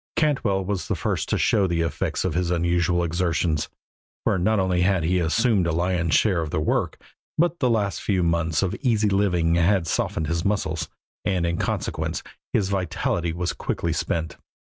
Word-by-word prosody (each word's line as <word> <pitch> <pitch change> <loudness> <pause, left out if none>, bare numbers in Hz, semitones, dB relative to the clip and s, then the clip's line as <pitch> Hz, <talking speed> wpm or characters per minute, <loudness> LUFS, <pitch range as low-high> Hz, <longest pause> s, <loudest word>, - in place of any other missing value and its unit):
Cantwell 115 -11 +1
was 100 -1 -2
the - - 0
first - - -2
to - - +1
show 100 -2 +3
the 85 -1 0
effects 85 - -2
of 90 - 0
his 90 +1 0
unusual 85 0 +1
exertions, 85 -2 0 0.5
for 95 - +1
not 110 +5 +2
only 95 -2 +1
had 95 -2 +2
he 90 +3 +2
assumed 95 +3 +2
a - - +1
lion's 85 -1 +1
share 95 -6 +3
of 80 - -4
the 75 - -1
work, 75 - 0 0.4
but 170 +1 +2
the 125 - +2
last 100 -6 0
few 95 -4 +1
months 85 0 +1
of 95 - 0
easy 110 -6 +2
living 90 -4 +2
had 85 +1 +3
softened 80 +1 -1
his 85 +2 -1
muscles, 95 -6 -1 0.3
and 90 -4 0
in 85 0 -1
consequence - - -2 0.3
his 100 -2 +1
vitality 90 -3 -1
was 85 +1 -2
quickly - - -2
spent. 80 -1 -2
90 Hz, 180 wpm, -24 LUFS, 85-100 Hz, 0.5 s, show